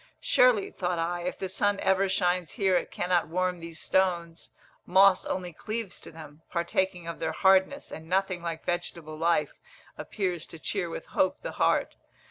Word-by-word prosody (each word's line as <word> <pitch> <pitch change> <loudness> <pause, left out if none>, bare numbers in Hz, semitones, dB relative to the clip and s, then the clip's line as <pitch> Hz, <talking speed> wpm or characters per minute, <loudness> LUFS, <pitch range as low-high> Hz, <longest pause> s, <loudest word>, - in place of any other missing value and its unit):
Surely, 245 -5 +3
thought 180 -1 -2
I, 175 +1 -1
if 180 - -3
the 190 - -3
sun 205 +2 +1
ever 190 0 +2
shines 180 -2 0
here 195 -5 +2
it - - 0
cannot 175 -2 0
warm 180 +2 -1
these 165 -1 -8
stones; 170 -3 0 0.3
moss 190 +1 +5
only 180 -2 -3
cleaves 215 +3 -5
to - - -12
them, 155 -1 -12
partaking 175 0 -1
of 170 - -5
their 160 -1 -2
hardness, 190 - +3
and 160 +1 -9
nothing 185 -1 0
like 165 -1 -5
vegetable 170 -2 -3
life 165 -1 +1 0.5
appears 180 -5 -3
to 165 - -11
cheer 175 +2 -2
with - - -6
hope 185 - 0
the - - -4
heart. - - +1
180 Hz, 170 wpm, -28 LUFS, 170-190 Hz, 0.5 s, moss